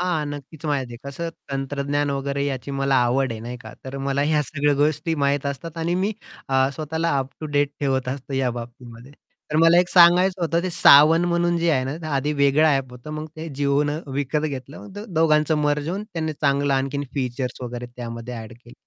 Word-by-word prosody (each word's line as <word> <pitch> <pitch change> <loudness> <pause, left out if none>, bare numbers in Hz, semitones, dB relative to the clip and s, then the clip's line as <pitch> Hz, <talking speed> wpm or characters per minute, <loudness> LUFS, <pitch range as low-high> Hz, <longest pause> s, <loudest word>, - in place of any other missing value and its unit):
हां, 175 -4 0
नक्कीच 145 +1 -8
माहिती 135 -5 -1
आहे - - -7
कसं 165 +5 -4 0.2
तंत्रज्ञान 140 +1 -1
वगैरे 140 0 -2
याची 140 -1 -3
मला 135 0 0
आवड 130 +1 +1
आहे, 110 - -7
नाही 120 +2 -6
का - - -10
तर 130 +1 -6
मला 140 +1 +1
ह्या 150 0 +2
सगळ्या 145 0 0
गोष्टी 150 +3 +1
माहीत 140 -1 0
असतात 140 +4 -5
आणि 170 +2 0
मी 195 +4 0 0.4
अ, 135 0 +3
स्वतःला 160 +1 -1
अप 135 0 -2
टू 155 - -4
डेट 145 -1 +1
ठेवत 135 -2 0
असतो 135 +1 -5
या 130 -2 +1
बाबतीमध्ये. 120 +1 -9 0.4
तर 150 - +1
मला 165 +2 +6
एक 180 - +3
सांगायचं 180 +1 +5
होतं, 170 +1 +1
ते 185 - -2
सावन 160 +1 +7
म्हणून 175 0 +1
जे 170 0 +2
आहे 130 -4 +1
ना 135 +3 -3
ते 155 - -5
आधी 145 0 0
वेगळं 140 +1 +3
ॲप 135 -4 +1
होतं, 125 +4 -10
मग 155 0 -5
ते 160 +1 -6
जिओ 140 0 +2
न 150 +1 -1 0.2
विकत 145 +2 -1
घेतलं 135 0 -7
मग 205 0 -10 0.2
दोघांचं 155 -1 +3
मर्ज 145 0 0
होऊन 195 +4 -3
त्याने 165 -7 -4
चांगलं 140 -1 +1
आणखीन 135 +2 -1
फीचर्स 130 -2 -3
वगैरे 120 0 -5
त्यामध्ये 120 0 -6
अ‍ॅड 110 0 -8
केले. 120 +1 -16
145 Hz, 205 wpm, -23 LUFS, 135-155 Hz, 0.4 s, सावन